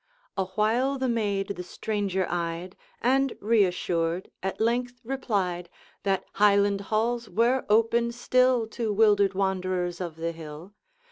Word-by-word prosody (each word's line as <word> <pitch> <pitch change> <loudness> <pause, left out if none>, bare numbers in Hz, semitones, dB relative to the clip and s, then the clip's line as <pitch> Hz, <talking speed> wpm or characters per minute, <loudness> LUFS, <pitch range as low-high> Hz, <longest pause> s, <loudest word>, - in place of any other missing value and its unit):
Awhile 220 +8 +1
the 260 0 -1
maid 205 -5 0
the 200 -3 -4
stranger 195 0 -2
eyed, 170 +1 -3 0.3
And, 270 +1 +2
reassured, 180 -5 +1
at 190 0 -3
length 245 +2 0
replied, 200 -9 -2 0.3
That 195 -2 0
Highland 200 -1 +3
halls 235 +2 0
were 240 +4 +1
open 230 +2 +3
still 255 0 +2
To 225 -1 -2
wildered 205 -2 +4
wanderers 185 -2 -1
of 170 -3 -4
the 165 +1 -3
hill. 160 +3 -10
205 Hz, 125 wpm, -27 LUFS, 185-235 Hz, 0.3 s, wildered